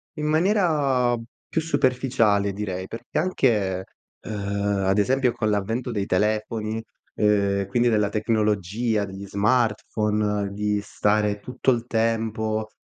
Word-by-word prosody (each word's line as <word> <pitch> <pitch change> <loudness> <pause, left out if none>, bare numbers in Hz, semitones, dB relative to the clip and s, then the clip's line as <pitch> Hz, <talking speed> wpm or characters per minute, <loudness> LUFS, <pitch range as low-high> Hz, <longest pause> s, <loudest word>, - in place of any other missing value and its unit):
In 150 - -3
maniera 155 - +2 0.3
più 165 - -1
superficiale, 125 -8 +2
direi, 95 -2 -4
perché 115 - -4
anche, 105 - +1 0.4
ehm, 110 - -6 0.5
ad 95 +1 +2
esempio 125 +4 +2
con 110 -2 -1
l'avvento 110 +5 -1
dei 100 -3 -2
telefoni, 110 +2 -1 0.3
ehm, 100 -2 +2
quindi 120 +4 +2
della 105 -2 +2
tecnologia, 105 0 0
degli 95 +1 -8
smartphone, 105 -2 0
di 105 0 -1
stare 105 0 +1
tutto 125 +4 -2
il 120 -1 -1
tempo, 110 -1 -1
110 Hz, 115 wpm, -24 LUFS, 105-120 Hz, 0.5 s, maniera